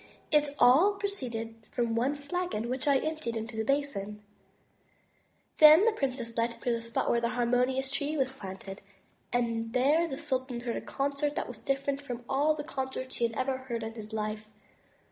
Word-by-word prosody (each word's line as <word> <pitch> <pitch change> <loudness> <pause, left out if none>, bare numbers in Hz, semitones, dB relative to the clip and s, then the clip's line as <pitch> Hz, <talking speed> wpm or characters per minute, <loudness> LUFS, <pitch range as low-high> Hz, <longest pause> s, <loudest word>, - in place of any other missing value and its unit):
It 295 -1 +3
all 310 +13 +6
proceeded 255 - -4 0.2
from 235 -2 -1
one 250 +5 +1
flagon, 285 -5 -3
which 260 +2 -3
I 280 -1 +5
emptied 310 -6 -3
into 225 +1 -5
the 220 - -1
basin.*' 210 -6 -1 1.4
Then 310 +6 +9
the 460 - +5
princess 255 - -3
led 235 0 +1
him - - -19
to 245 - +1
the 230 -1 -1
spot 230 0 -2
where 235 - +2
the 235 - +1
harmonious 250 +2 +1
Tree 285 +2 0
was 265 -2 +1
planted; 195 -5 -8 0.5
and 230 -1 -1
there 295 +7 +3
the 270 -4 -5
sultan 260 -5 -2
heard 240 -1 -3
a - - -4
concert 285 +1 -1
that - - -2
was 245 -3 -8
different 275 +3 -1
from 245 -3 -6
all 295 +3 +2
the 295 - -5
concerts 265 -3 -4
he 235 - +2
had 225 - -9
ever 260 0 0
heard 240 -3 -4
in 220 0 -5
his 220 -1 -9
life. 215 0 -3
260 Hz, 185 wpm, -30 LUFS, 230-285 Hz, 1.4 s, Then